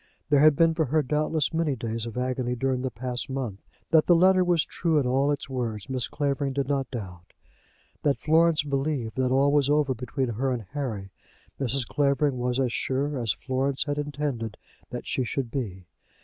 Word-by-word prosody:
There 145 - +6
had 150 0 +6
been 165 +2 +4
for 160 -1 +1
her, 150 +3 +1
doubtless, 150 +2 0
many 160 -4 +1
days 115 -1 -4
of 115 - -7
agony 125 -1 -1
during 130 +1 0
the 130 - -1
past 125 +1 -4
month. 125 -7 -4 0.3
That 160 -2 +5
the 175 - +6
letter 185 +2 +5
was 175 -3 +2
true 165 -3 0
in 140 - +2
all 135 +3 +2
its 145 - -3
words 120 -6 -3
Mrs. 130 -2 -2
Clavering 140 -2 -1
did 140 -1 -1
not 140 -1 -1
doubt. 90 -8 -8 0.7
That 140 -2 +2
Florence 160 0 +3
believed 140 -4 -2
that 130 -1 +2
all 135 +2 +4
was 145 -1 +3
over 145 -2 +3
between 125 +2 -3
her 125 +4 -1
and 120 -3 -2
Harry, 110 -10 -4 0.5
Mrs. 135 -1 0
Clavering 140 -2 +1
was 125 +1 0
as 125 -3 +1
sure 140 +1 -1
as 115 -3 +1
Florence 135 +1 -1
had 145 0 -2
intended 145 -7 -3 0.3
that - - -6
she 130 - -1
should 125 0 -3
be. 100 -10 -4
135 Hz, 190 wpm, -26 LUFS, 125-145 Hz, 0.7 s, There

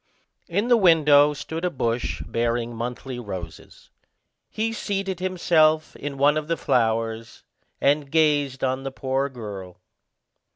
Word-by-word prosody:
In 200 +7 -1
the 240 -1 +5
window 150 -6 +5
stood 160 +3 -6
a 180 - +1
bush 120 -6 -2
bearing 120 0 -1
monthly 125 +2 -5
roses. 95 -7 -9 0.6
He 225 +1 -2
seated 195 -4 -3
himself 160 -4 +2
in 140 -1 -6
one 145 +2 +4
of 155 -1 -3
the 165 0 -1
flowers, 115 -1 -1 0.4
and 145 0 +2
gazed 145 -4 +1
on 130 0 0
the 135 - -4
poor 135 +1 -1
girl. 100 -7 -8
140 Hz, 130 wpm, -24 LUFS, 120-160 Hz, 0.6 s, the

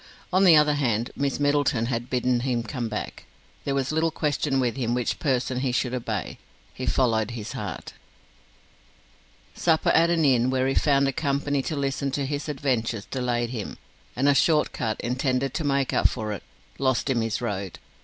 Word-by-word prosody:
On 190 +1 +5
the 170 -3 +8
other 150 -1 +5
hand, 120 -5 0
Miss 140 0 -1
Middleton 145 -4 +2
had 120 0 -3
bidden 125 -1 +1
him 120 -2 -1
come 120 -1 -4
back. 105 - -5 0.4
There 140 - 0
was 135 0 0
little 160 +1 +2
question 150 -3 0
with 120 -3 0
him 120 -2 -1
which 125 -2 -1
person 130 -3 0
he 130 -1 0
should 125 0 0
obey: 115 -6 -3 0.3
he 130 - -5
followed 115 -4 +2
his 115 -3 -6
heart. - - -6 1.6
Supper 160 -2 +2
at 165 +1 +4
an 165 -2 +2
inn, 125 -2 +3
where 130 0 +1
he 135 - +1
found 140 -1 +3
a 135 - 0
company 145 -2 0
to 155 - -3
listen 140 0 -1
to 140 -1 -1
his 145 +2 -3
adventures, 120 -7 -1
delayed 120 -2 -1
him, 110 -5 -5 0.4
and 130 +4 +1
a 145 - +6
short 150 +3 +3
cut, 110 -2 -2
intended 130 +1 -1
to - - -2
make 140 -2 +1
up - - +4
for 110 -4 -4
it, 100 - -6 0.4
lost 130 -1 +1
him 130 -4 +1
his 115 -1 -1
road. 100 -6 -4
130 Hz, 185 wpm, -25 LUFS, 120-145 Hz, 1.6 s, the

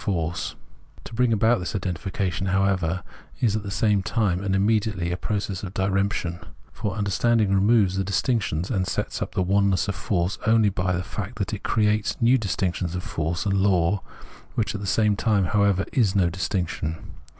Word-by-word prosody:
Force. 85 -6 -2 0.5
To - - -10
bring 125 +1 +2
about 115 +2 +3
this 90 +1 -4
identification, 95 0 -2
how 95 +1 +2
ever, 90 -2 0 0.4
is 110 -4 +2
at 110 - -1
the 100 - -6
same 100 0 +2
time 95 -2 0
and 95 -1 0
immediately 100 -3 +1
a - - 0
process 100 -1 -3
of 95 -1 -7
diremption; 95 -3 0 0.3
for 100 -3 -3
understanding 105 +1 +2
removes 100 -1 +3
the 95 - +1
dis 100 +1 0
tinctions 95 - -1
and 95 -5 0
sets - - -3
up - - -4
the 95 - +2
oneness 100 -1 +2
of 105 - -1
force 90 -1 -1
only 110 -2 +5
by 90 -1 -1
the 90 +1 -1
fact 105 +3 -6
that 100 0 -2
it 105 - -4
creates 105 -2 +1
a - - -2
new 125 +3 +5
distinction 95 -3 -1
of 90 +2 -4
force 80 +4 -2
and 100 -1 +1
law, 95 -1 +2 0.5
which 115 - 0
at 105 - -5
the 100 - -4
same 105 +3 +2
time, 105 -1 +2
however, 100 -1 +2
is 110 -8 +2
no 90 -3 +3
distinction. 90 -3 -2
100 Hz, 190 wpm, -24 LUFS, 90-105 Hz, 0.5 s, only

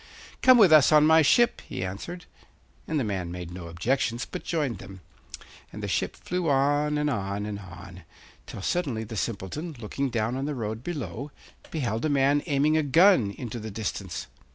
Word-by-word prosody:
'Come 255 -1 +7
with 195 -8 +7
us 155 -1 +7
on 150 -1 +6
my 160 +1 +6
ship,' 240 +10 +3
he 95 - -3
answered; 165 - -7 0.6
and 155 -1 0
the - - 0
man 95 -5 -3
made 90 -1 -7
no 90 -1 -8
objections, 120 +7 -1
but 180 - -7
joined 145 - -2
them; 95 0 -11 0.7
and - - -8
the - - -2
ship - - -1
flew 180 -2 -2
on, 145 +2 +2
and 150 0 0
on, 100 -5 -2
and 105 -1 -5
on, 90 -1 -11 0.5
till 95 - -8
suddenly 135 - -1
the 110 +1 -8
Simpleton, 115 - -4
looking 135 +5 -3
down 115 0 -1
on 135 +1 -2
the 150 0 -3
road 110 -1 -4
below, 140 - -5 0.4
beheld 115 -8 -2
a 155 - +1
man 140 +1 +3
aiming 145 0 +2
with 155 -1 +2
a - - -6
gun 165 - +5
into 120 +2 -6
the 110 0 -6
distance. 100 -3 -4
130 Hz, 190 wpm, -26 LUFS, 100-150 Hz, 0.7 s, Come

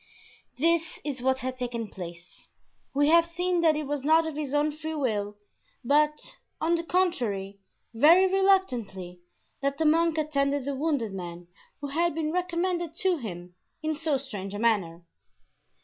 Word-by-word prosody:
This 330 +3 +1
is 275 -4 -4
what 265 +1 +1
had 255 0 -4
taken 240 -2 -3
place: 175 -2 -10 0.5
We 290 +1 +4
have 335 +1 +5
seen 355 +1 0
that 320 -2 +4
it 305 0 -2
was 285 -1 -3
not 320 +2 +4
of 320 - -3
his 295 -3 -3
own 295 +1 +2
free 315 +1 -5
will, 210 -7 -1 0.5
but, 300 +3 +1 0.2
on 330 +2 +1
the 335 0 0
contrary, 235 - -1 0.3
very 325 +11 +6
reluctantly, 250 - +1 0.4
that 275 0 -1
the 320 - 0
monk 330 +1 +3
attended 285 -3 0
the 280 - -2
wounded 275 -7 -1
man 175 -2 -7 0.3
who 285 - -4
had 335 +2 0
been 310 -1 -1
recommended 345 -1 -1
to 370 -2 +1
him 180 - -7 0.3
in 315 0 0
so 305 -2 0
strange 205 -7 -6
a - - -3
manner. 195 -7 0
290 Hz, 160 wpm, -27 LUFS, 225-330 Hz, 0.5 s, very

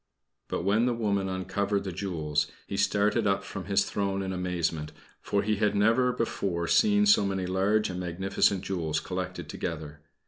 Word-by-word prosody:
But - - -3
when 105 +5 +3
the 120 - +1
woman 100 -4 0
uncovered 100 +2 -1
the 95 - -4
jewels, 80 -5 -1 0.2
he - - -5
started 105 +2 +2
up 100 0 +1
from 95 -1 -7
his 100 0 +2
throne 100 -1 -1
in 95 0 -3
amazement, 85 -4 -2 0.3
for 100 0 0
he 105 0 0
had 105 0 +1
never 115 +5 +3
before 95 -7 -2
seen 210 - +4
so 205 - +6
many 95 -2 -1
large 95 +4 +1
and 90 - -5
magnificent 95 +2 0
jewels 85 -5 -1
collected - - -5
together. 75 -2 -5
95 Hz, 170 wpm, -28 LUFS, 90-105 Hz, 0.3 s, so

